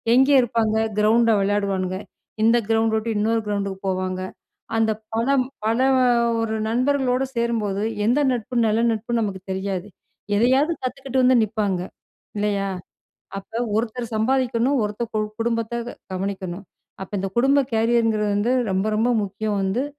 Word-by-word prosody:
எங்கே 265 +3 +5
இருப்பாங்க? 225 -2 0 0.2
கிரவுண்ட்ல 225 +2 +4
விளையாடுவான்ங்க. 195 -2 0 0.5
இந்த 230 +2 +5
கிரவுண்ட் 225 0 +2
உட்டு 220 +1 -3
இன்னொரு 225 +2 +1
கிரவுண்டுக்கு 200 -2 -2
போவாங்க. 185 0 -2 0.6
அந்த 225 0 +2 0.2
பலம் 255 +3 +2 0.2
பல 225 +2 +1 0.6
ஒரு 225 -1 -1
நண்பர்களோடு 255 +2 +1
சேரும்போது, 220 -4 -1 0.2
எந்த 245 +6 +3
நட்பு 245 0 -3
நல்ல 220 +1 +2
நட்புன்னு 230 +1 -1
நமக்கு 195 -3 -3
தெரியாது. 190 0 -3 0.5
எதையாவது 260 +8 +3
கத்துக்கிட்டு 260 0 -1
வந்து 255 0 +5
நிப்பாங்க. 205 -4 -1 0.6
இல்லையா? 205 -1 0 0.7
அப்ப 225 +4 -6 0.2
ஒருத்தர் 235 +1 -3
சம்பாதிக்கணும், 255 +3 +1
ஒருத்தர் 210 +2 -4
கு 215 - +1 0.2
குடும்பத்த 235 +1 -2 0.2
கவனிக்கணும். 190 0 -4 0.4
அப்ப 190 - -8
இந்த 195 - -2
குடும்ப 275 +3 +4
கேரியர்ங்குறது 225 -2 +2
வந்து 220 +5 +1 0.2
ரொம்ப 190 +2 0
ரொம்ப 230 +3 +2
முக்கியம் 205 +1 -2
வந்து, 195 +8 0
225 Hz, 130 wpm, -22 LUFS, 205-240 Hz, 0.7 s, எங்கே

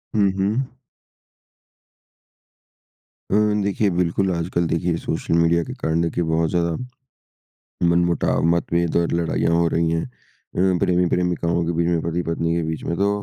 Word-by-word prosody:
हुँ, 100 -2 +3
हुँ। 110 +7 -1 2.6
अ, - - +3 0.3
देखिए 100 +1 +1
बिल्कुल 90 +1 0
आजकल 85 +1 -1
देखिए 85 +1 0
सोशल - - -3
मीडिया 85 0 +3
के - - -7
कारण 80 +1 -1
देखिए 85 +1 -1
बहुत 80 0 +1
ज़्यादा, 85 -2 0 1.1
मनमुटाव, 85 0 +2
मत्तभेद 85 0 -1
और 85 0 +1
लड़ाइयाँ 85 0 0
हो 85 0 +3
रही 85 0 +1
हैं। 80 0 0
अ, 95 -6 -3
प्रेमी-प्रेमिकाओं 90 -1 +1
के 85 - 0
बीच 85 +1 0
में 85 -2 +1
पति-पत्नी 85 0 -1
के 85 - 0
बीच 80 -1 -4
में 85 - -2
तो 100 +1 +2
85 Hz, 140 wpm, -22 LUFS, 85-90 Hz, 2.6 s, हुँ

